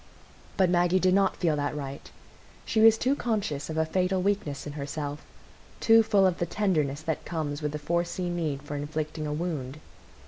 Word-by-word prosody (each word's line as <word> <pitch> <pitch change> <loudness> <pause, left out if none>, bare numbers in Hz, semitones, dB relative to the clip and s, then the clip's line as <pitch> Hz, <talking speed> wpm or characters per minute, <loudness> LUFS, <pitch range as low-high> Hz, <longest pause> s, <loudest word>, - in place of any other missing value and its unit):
But 190 -2 +4
Maggie 175 +1 +3
did 185 0 +3
not 195 0 +2
feel 165 -4 +1
that 145 +1 -2
right; 140 -1 -6 0.6
she 220 - +1
was 225 0 +7
too 260 +5 +1
conscious 200 - -2
of 160 0 0
fatal 185 +1 +1
weakness 185 -8 -1
in 145 - -6
herself, 145 0 -5 0.6
too 225 0 +6
full 210 -3 +3
of 185 -2 +1
the 175 - 0
tenderness 155 -7 0
that 160 -1 -2
comes 155 -3 -3
with 150 -1 -1
the 150 - -3
foreseen 170 +3 -2
need 150 -5 -2
for 145 0 -6
inflicting 155 +1 -3
a 150 - -2
wound. 150 -5 -3
160 Hz, 180 wpm, -27 LUFS, 145-185 Hz, 0.6 s, was